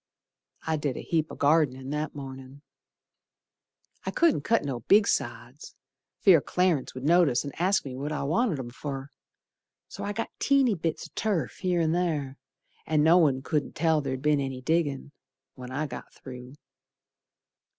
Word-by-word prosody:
I 160 -1 0
did 145 -4 -2
a - - -6
heap 160 -2 -1
o' - - -7
gardenin' 140 -3 +2
That 150 +1 -3
mornin'. 135 0 -9 1.4
I - - -3
couldn't 330 - +2
cut 225 +2 +1
no 135 -4 -3
big 200 - +4
sods - - -3 0.5
Fear 180 -7 +6
Clarence 170 -1 0
would 130 - -7
notice 155 -5 +4
and 140 - -6
ask 190 0 +2
me 130 -2 -6
what 140 +3 -4
I 150 - -2
wanted 165 - +1
'em 120 -2 -6
fer, 135 +1 -6 0.8
So - - -8
I 205 - -2
got 225 +2 -4
teeny 275 -4 +3
bits 165 -3 -3
o' - - -30
turf 195 - -1
here 180 -2 0
and 160 0 +1
ther, 155 -6 -1 0.5
And 155 -1 +2
no 165 +3 +6
one 135 -5 +2
couldn't 150 0 -2
tell 160 -1 +2
ther'd 130 -1 -4
be'n 150 -1 +3
any 135 -2 -3
diggin' 145 -2 -1 0.4
When 125 -1 -9
I 145 +4 -2
got 145 - -8
through. 125 0 -11
150 Hz, 165 wpm, -27 LUFS, 135-170 Hz, 1.4 s, Fear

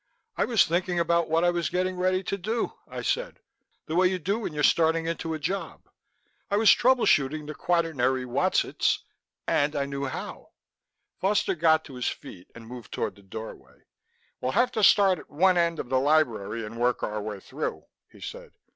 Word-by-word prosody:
"I - - +1
was 230 -4 +4
thinking 175 +1 0
about 170 -1 +1
what 165 +1 +2
I 175 - +4
was 170 -4 -1
getting 185 +1 -1
ready 185 +1 0
to 200 - -2
do," 215 +5 -2
I - - -7
said, - - -2 0.5
"the 155 - -5
way 185 +1 +5
you 185 0 -1
do 195 +6 -1
when 220 - -4
you're 150 -1 -3
starting 165 +1 +3
into 165 -1 -3
a - - -3
job; 190 +6 -4 0.6
I 200 - +1
was 220 0 +6
trouble 255 0 +4
shooting 145 +2 +2
the 150 - -6
quaternary 145 -7 0
whatzits 120 - +1 0.4
and 150 +1 +1
I 140 -1 0
knew 140 0 -4
how...!" 135 - -7 0.7
Foster 200 +1 +1
got 160 -2 +3
to 140 - -11
his 125 -1 -3
feet 90 -1 -7
and 115 -1 -11
moved 120 -1 -10
toward 100 - -2
the 100 - -18
doorway. 110 +3 -10 0.6
"We'll 130 - -2
have 250 +1 +3
to 215 - -1
start 195 -4 +5
at - - -14
one 180 +5 +3
end 170 -1 +1
of 120 - -5
the 130 0 +2
library 115 -7 +1
and 115 +2 -8
work 125 +1 +1
our 105 0 -2
way 105 -1 -5
through," - - -5 0.3
he - - -17
said. - - -8
160 Hz, 195 wpm, -26 LUFS, 130-185 Hz, 0.7 s, was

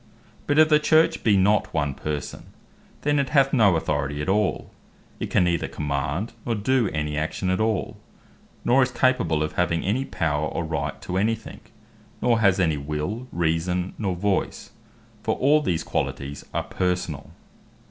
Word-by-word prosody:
But 145 - +1
if 155 0 +6
the 150 -1 +5
Church 155 +1 +3
be 105 -3 +4
not 100 -1 +2
one 75 -3 0
person, 75 +1 -5 0.6
then 145 0 +2
it 140 -2 0
hath 135 -2 +3
no 105 -9 +5
authority 75 -2 -1
at 75 - -2
all; 105 0 0 0.5
it - - -3
can - - +3
neither 85 -2 0
command, 75 - -3
nor 115 - -1
doe 115 +2 +1
any 75 -3 -2
action 90 +4 -2
at 95 - 0
all; 110 -3 -1 0.7
nor 130 +3 +5
is 130 - +2
capable 110 -12 +1
of 75 0 -3
having 85 -1 0
any 115 +8 0
power, 80 - -1
or 85 - -3
right 70 -3 -3
to 90 - -3
any 110 +4 +2
thing; 110 - -11 0.6
nor 120 -2 +2
has 100 -3 +3
any 80 -5 +2
Will, 75 - -4
Reason, 85 +2 -1
nor 95 -4 -1
Voice; 100 +2 -2 0.5
for - - 0
all 145 +4 +3
these 85 - -1
qualities 70 +1 -4
are - - -1
personall. 90 -6 -2
90 Hz, 170 wpm, -24 LUFS, 75-115 Hz, 0.7 s, if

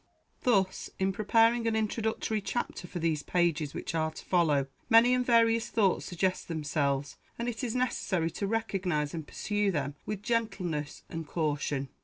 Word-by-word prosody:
Thus, 195 -7 +1
in 190 0 +1
preparing 230 +3 +3
an 225 - +1
introductory 220 0 -1
chapter 200 -4 -3
for 175 - -6
these 160 -3 0
pages 165 -4 0
which - - -4
are 160 -1 +1
to 155 - -11
follow, 155 -6 +3 0.2
many 235 +2 +7
and 250 0 +2
various 230 -1 +3
thoughts 200 -5 +2
suggest 185 +1 -1
themselves, 145 -3 -1 0.2
and 235 - -3
it 240 +1 -3
is 235 -2 -2
necessary 190 -9 0
to 200 - -3
recognize 185 -9 -1
and 160 -3 -5
pursue 205 -1 -1
them 145 -5 -1
with 210 -1 -4
gentleness 185 -11 -2
and 165 -2 -6
caution. 145 -4 -1
185 Hz, 160 wpm, -30 LUFS, 155-225 Hz, 0.2 s, many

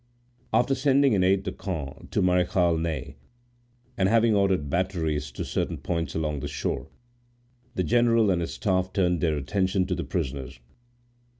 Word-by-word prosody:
After 135 +3 +3
sending 135 -1 +3
an 95 -3 +3
aide 95 +1 +3
de - - -3
camp 75 -8 -6
to - - 0
Marechal 90 -1 +2
Ney, 80 -3 -3 0.8
and 95 0 +2
having 115 0 +4
ordered 95 -7 +2
batteries 80 -3 -1
to - - -4
certain - - -2
points 85 -1 -3
along 75 -2 -1
the - - -4
shore, - - -3 0.9
the 90 - 0
general 115 +2 +3
and 85 -2 +1
his 85 - -4
staff 95 -2 0
turned 90 -4 +1
their 80 -3 +1
attention 95 +6 0
to 90 - -2
the - - -2
prisoners. 70 -7 -4
90 Hz, 160 wpm, -26 LUFS, 80-100 Hz, 0.9 s, having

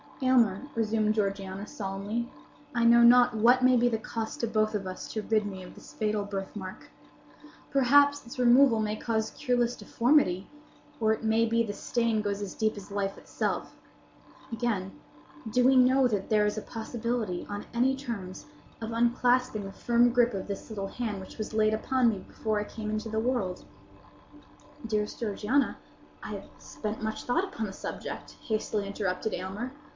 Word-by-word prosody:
"Aylmer," 235 -7 +4
resumed 215 -1 +1
Georgiana, 195 -1 -2
solemnly, 205 +4 -4 0.5
"I 235 -1 +2
know 235 0 +7
not 245 0 +7
what 245 +4 +4
may 255 0 +6
be 245 0 +4
the 225 - 0
cost 220 0 -5
to 235 - 0
both 215 -1 +1
of 200 -2 -2
us 185 0 -6
to 215 - -2
rid 215 -1 +1
me 190 -2 -7
of 180 - -11
this - - -14
fatal 210 -1 -1
birthmark. 195 -1 -6 0.8
Perhaps 285 +1 +4
its 235 - -10
removal 250 -1 +5
may 215 0 -1
cause 220 -1 -1
cureless 245 -3 0
deformity; 230 -8 +2 0.5
or 220 -1 +3
it 220 - -1
may 225 +1 +3
be 230 +1 +2
the 205 -3 -4
stain 230 0 0
goes 205 -1 -2
as 200 -2 -5
deep 215 -1 0
as 205 0 -10
life 200 -1 -2
itself. - - -3 0.8
Again: 225 -5 -1 0.6
do 250 +3 +2
we 265 +2 +5
know 260 +1 +5
that 205 -5 -2
there 210 -1 +4
is 210 +1 -1
a - - -2
possibility, 225 -4 -3
on 205 0 -5
any 255 +3 +2
terms, 225 -9 -6 0.3
of 225 0 -5
unclasping 240 -1 +2
the 195 - -6
firm 240 +4 +3
gripe 240 -2 +3
of 190 - -4
this 200 +2 -6
little 200 -3 -4
hand 215 -3 -4
which 190 - -11
was 215 - -4
laid 215 0 +3
upon 250 +2 +2
me 210 -4 -2
before 215 -2 -2
I - - -1
came 215 0 -6
into 215 +1 -3
the 220 0 -1
world?" 220 -7 -1 1.2
"Dearest 210 -2 -2
Georgiana, 230 +5 0 0.5
I - - -5
have - - -7
spent 215 +1 -6
much 220 0 -3
thought 290 +9 +1
upon 375 - -4
the 190 - -7
subject," - - -7
hastily 215 -2 -1
interrupted 200 +1 -2
Aylmer. 195 +7 -4
220 Hz, 175 wpm, -29 LUFS, 205-240 Hz, 1.2 s, know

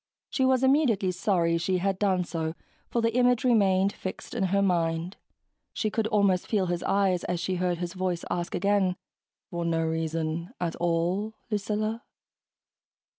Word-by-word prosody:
She 260 - +2
was 260 0 +3
immediately 260 -9 +3
sorry 175 -3 +1
she 185 +2 0
had 190 +1 -1
done 190 -3 +2
so, 160 -2 -3 0.3
for 235 - 0
the 230 0 +2
image 250 0 +3
remained 200 -5 +3
fixed 185 - -7
in 225 -5 0
her 200 +2 +2
mind; 170 -1 0 0.6
she 215 - -1
could 220 0 0
almost 200 -4 +2
feel 205 -4 +1
his 175 -1 -2
eyes 195 -3 +1
as 175 -1 -1
she 185 +2 -1
heard 180 -1 0
his 175 0 -4
voice 185 -2 -2
ask 175 -1 -2
again, 195 -1 +2 0.6
"For 170 -1 -2
no 165 -1 +1
reason 160 - -2
at 170 -2 -2
all, 175 +6 0 0.2
Lucilla?" 215 +2 -1
185 Hz, 160 wpm, -27 LUFS, 170-210 Hz, 0.6 s, was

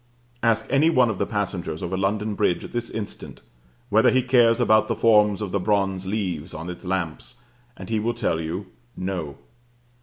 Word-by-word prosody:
Ask 115 -1 +2
any 145 +4 +4
one 125 -8 +3
of 100 - -6
the - - 0
passengers 90 -6 -3
over 90 +2 -2
London 105 +3 -1
Bridge 90 -3 0
at - - -9
this 120 -1 -3
instant 110 -2 -6 0.5
whether 110 +1 +5
he 130 -1 +2
cares 120 -2 +4
about 110 -3 +4
the - - -1
forms 105 -2 +4
of 100 - -4
the 100 - 0
bronze 95 -1 0
leaves 90 -6 -3
on 85 +3 -5
its 90 - -10
lamps, 90 +4 -3 0.4
and - - -9
he 110 -1 0
will 120 +3 -1
tell 95 -8 -1
you, 85 +5 -4 0.3
No. 90 -7 -4
105 Hz, 185 wpm, -24 LUFS, 90-115 Hz, 0.5 s, whether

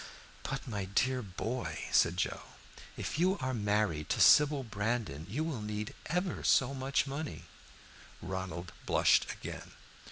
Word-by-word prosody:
"But, 135 0 -4
my 105 -5 -3
dear 125 +7 +1
boy," 115 +5 -4
said 85 +2 +4
Joe, - - -1 0.6
"if - - -3
you 185 +3 +3
are 130 -1 -2
married 105 - 0
to - - 0
Sybil 145 -2 +6
Brandon, 105 - -2
you 140 +10 -1
will 155 -9 -3
need 105 0 -4
ever 180 +2 -1
so 135 0 +4
much 135 +1 0
money." 135 - -5 0.8
Ronald 95 -2 -5 0.2
blushed - - +4
again. - - -8
115 Hz, 135 wpm, -32 LUFS, 95-135 Hz, 0.8 s, Sybil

